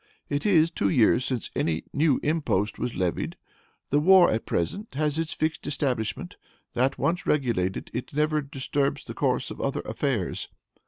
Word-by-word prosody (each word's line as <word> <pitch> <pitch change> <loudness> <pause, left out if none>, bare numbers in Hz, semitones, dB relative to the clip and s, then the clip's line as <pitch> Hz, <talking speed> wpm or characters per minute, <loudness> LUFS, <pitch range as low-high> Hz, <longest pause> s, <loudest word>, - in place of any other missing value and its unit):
It 145 +8 -1
is 165 -4 +4
two 100 - 0
years 115 +4 +4
since 125 -3 -3
any 80 -1 0
new 145 -1 +3
impost 145 - 0
was 125 - -2
levied. 90 -2 -1 0.6
The 145 - +4
war, 185 +3 +7
at 110 - -2
present, 195 - -2
has 150 +1 0
its 165 -1 -2
fixed 155 -1 -2
establishment; 130 0 -2 0.4
that 130 +3 +1
once 175 +2 -1
regulated, 115 -10 0
it - - -4
never 150 +1 +1
disturbs 140 0 -2
the - - -6
course - - 0
of - - -7
other - - -1
affairs. - - -2
140 Hz, 160 wpm, -26 LUFS, 120-155 Hz, 0.6 s, war